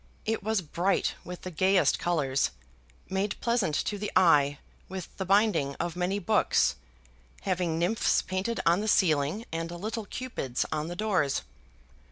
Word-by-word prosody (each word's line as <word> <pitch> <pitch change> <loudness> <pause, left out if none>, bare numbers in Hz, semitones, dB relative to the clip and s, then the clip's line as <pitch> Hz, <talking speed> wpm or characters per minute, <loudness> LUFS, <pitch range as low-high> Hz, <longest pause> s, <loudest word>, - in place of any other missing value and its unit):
It 225 +1 -1
was 215 -2 0
bright 175 +5 0
with 180 0 -8
the 185 - -5
gayest 185 +3 +3
colours, 140 -6 +1 0.6
made 195 +1 -2
pleasant 235 -10 +1
to 205 - -2
the 210 - -3
eye 145 -6 +5 0.3
with 185 -2 -7
the 190 - -3
binding 195 -8 +2
of 170 -1 -3
many 180 +2 0
books, 210 +2 +2 0.7
having 180 -4 -1
nymphs 180 +7 +2
painted 190 +5 -2
on 170 +2 +4
the 215 - -3
ceiling 165 +1 +2
and 165 +1 -3
little 210 +6 -4
Cupids 200 - -3
on 155 0 -2
the 175 - -5
doors. 185 -9 0
185 Hz, 150 wpm, -28 LUFS, 165-205 Hz, 0.7 s, eye